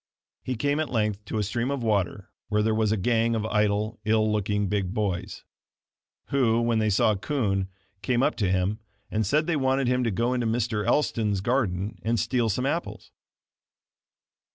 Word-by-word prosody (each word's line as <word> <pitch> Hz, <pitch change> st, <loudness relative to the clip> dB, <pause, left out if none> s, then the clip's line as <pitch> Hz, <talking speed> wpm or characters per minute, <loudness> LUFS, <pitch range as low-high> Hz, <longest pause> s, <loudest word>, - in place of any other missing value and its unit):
He 130 Hz, -, -3 dB
came 145 Hz, +5 st, 0 dB
at 155 Hz, -, -1 dB
length 105 Hz, -3 st, -1 dB
to 110 Hz, -, -4 dB
a 105 Hz, -, +1 dB
stream 115 Hz, +5 st, -1 dB
of 140 Hz, -3 st, -2 dB
water 100 Hz, -3 st, -1 dB, 0.2 s
where 105 Hz, -1 st, +2 dB
there 110 Hz, 0 st, +2 dB
was 110 Hz, -1 st, +1 dB
a 110 Hz, -, +1 dB
gang 115 Hz, +3 st, +1 dB
of 110 Hz, -1 st, -1 dB
idle, 105 Hz, 0 st, 0 dB
ill 110 Hz, 0 st, +2 dB
looking, 105 Hz, -1 st, 0 dB
big 95 Hz, -2 st, -1 dB
boys; 100 Hz, -5 st, -2 dB, 0.9 s
who, 120 Hz, -4 st, +2 dB
when 115 Hz, -1 st, +1 dB
they 110 Hz, 0 st, +2 dB
saw 105 Hz, +2 st, +3 dB
Kund, 100 Hz, -3 st, -1 dB, 0.3 s
came 125 Hz, +3 st, +1 dB
up -, -, +2 dB
to 100 Hz, -6 st, +1 dB
him; 95 Hz, +3 st, 0 dB, 0.3 s
and 110 Hz, -2 st, 0 dB
said 150 Hz, +8 st, +2 dB
they 170 Hz, -1 st, 0 dB
wanted 135 Hz, -2 st, +1 dB
him 125 Hz, 0 st, +2 dB
to 115 Hz, -, +1 dB
go 115 Hz, +5 st, 0 dB
into 120 Hz, -2 st, 0 dB
Mr. 110 Hz, -2 st, 0 dB
Elston's 110 Hz, -9 st, +1 dB
garden 105 Hz, -4 st, -1 dB
and 115 Hz, +5 st, 0 dB
steal 120 Hz, -1 st, +1 dB
some 125 Hz, +6 st, -1 dB
apples. 165 Hz, +5 st, -3 dB
110 Hz, 180 wpm, -26 LUFS, 105-120 Hz, 0.9 s, saw